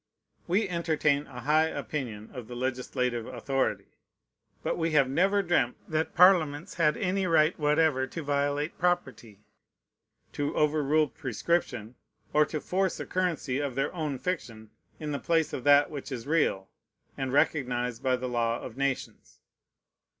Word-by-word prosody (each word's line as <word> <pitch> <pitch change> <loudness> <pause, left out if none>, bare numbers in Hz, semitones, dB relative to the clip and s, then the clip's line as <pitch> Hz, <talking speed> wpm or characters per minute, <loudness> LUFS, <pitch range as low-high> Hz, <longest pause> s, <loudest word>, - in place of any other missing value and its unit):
We 195 +4 +2
entertain 155 -4 0
a 125 -3 -9
high 155 +4 +3
opinion 120 -10 -5
of 125 -5 -8
the 125 - -8
legislative 125 -1 -2
authority; 135 -1 -2 0.6
but - - 0
we 165 -1 -1
have 140 -3 +5
never 195 +9 +2
dreamt 150 -9 +1
that 155 0 -2
Parliaments 175 -2 +4
had 155 -3 +2
any 195 -3 0
right 160 0 +4
whatever 150 -3 +2
to 165 +4 -6
violate 145 +2 -1
property, 130 - -1 0.9
to 145 0 -2
overrule 150 0 +2
prescription, 125 -4 -2 0.4
or 150 0 +4
to 155 - -3
force 190 +3 -1
a - - -4
currency 165 -8 -1
of 140 -4 -3
their 135 +2 -1
own 155 -6 -3
fiction 115 -10 -5 0.3
in 150 -1 -4
the 140 - -2
place 165 -2 +1
of 125 - -4
that 145 +1 +6
which 145 -2 -7
is 120 -3 -5
real, 145 -11 +1 0.5
and 135 -1 -3
recognized 125 -5 0
by 130 -1 +2
the 125 0 -4
law 120 -1 0
of 125 0 -9
nations. 140 -1 -3
145 Hz, 150 wpm, -28 LUFS, 130-165 Hz, 0.9 s, that